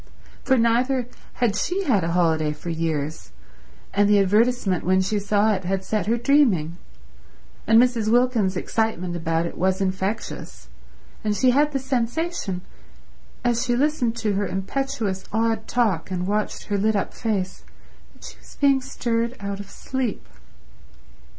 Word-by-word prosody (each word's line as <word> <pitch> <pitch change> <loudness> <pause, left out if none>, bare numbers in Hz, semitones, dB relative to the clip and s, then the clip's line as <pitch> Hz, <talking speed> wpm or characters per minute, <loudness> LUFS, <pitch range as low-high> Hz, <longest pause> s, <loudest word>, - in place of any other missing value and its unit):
For 265 -1 +3
neither 245 +2 +2 0.3
had 230 -4 0
she 365 - -1
had 220 - +2
a 165 0 -1
holiday 160 -3 +2
for 170 +3 -6
years, 155 - -3 0.6
and 205 +1 +3
the 210 - +5
advertisement 205 -1 +2
when 185 +2 +3
she 205 +3 0
saw 205 +1 +2
it 190 -1 -3
had 190 +1 -1
set 210 +1 -1
her 230 +2 +2
dreaming, 225 - +2 0.9
and 225 +1 +6
Mrs. 240 -3 +2
Wilkins's 235 -6 +2
excitement 185 -4 -1
about 165 0 0
it - - -6
was 190 +1 +1
infectious, 190 - -3 0.5
and 210 -1 0
she 255 +3 +4
had 295 +3 +3
the 280 - 0
sensation, 260 - -2 0.8
as 240 0 +1
she 245 -1 +1
listened 260 -4 +1
to 215 -3 -1
her 200 0 0
impetuous, 205 0 -3
odd 225 0 0
talk 215 -10 0
and 180 -1 -2
watched 210 +2 -2
her 205 -1 -1
lit 215 +2 +2
up 200 - -1
face, 195 -5 -3 0.5
that - - -19
she - - -10
was - - -17
being 275 -2 +4
stirred 235 -2 -2
out 200 0 -4
of 200 - -8
sleep. 260 -5 -4
215 Hz, 155 wpm, -23 LUFS, 185-245 Hz, 0.9 s, and